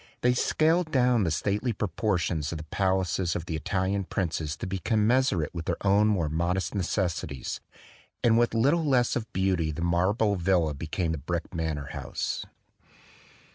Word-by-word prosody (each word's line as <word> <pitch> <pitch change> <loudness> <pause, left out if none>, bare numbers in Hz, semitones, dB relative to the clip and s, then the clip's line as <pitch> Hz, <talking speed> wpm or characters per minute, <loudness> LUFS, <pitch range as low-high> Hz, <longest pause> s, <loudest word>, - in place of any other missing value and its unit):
They 125 0 +4
scaled 160 +6 +2
down 125 -6 +3
the - - +1
stately 100 +9 0
proportions 90 -6 -1
of 85 - -3
the 75 - -7
pal 95 +4 +1
aces 90 -1 -1
of 85 - -3
the 80 - -3
Italian 95 +4 -1
princes 80 -4 -2
to - - -5
be 95 +1 -3
commensurate 110 - +2
with 85 -2 -5
their - - -1
own 100 +2 +4
more 95 -7 +1
modest 85 +5 -1
necessities; 85 - -2 0.6
and 115 -1 +5
with 120 0 +2
little 140 +9 +3
less 130 -5 +2
of 115 -2 -3
beauty 95 -4 +1
the 80 +3 -4
marble 100 +5 +2
villa 85 -3 +2
be 75 +3 -6
came 85 0 -1
the 80 - -3
brick 85 +6 -4
manor 80 -4 -3
house. - - -4
95 Hz, 170 wpm, -27 LUFS, 80-110 Hz, 0.6 s, and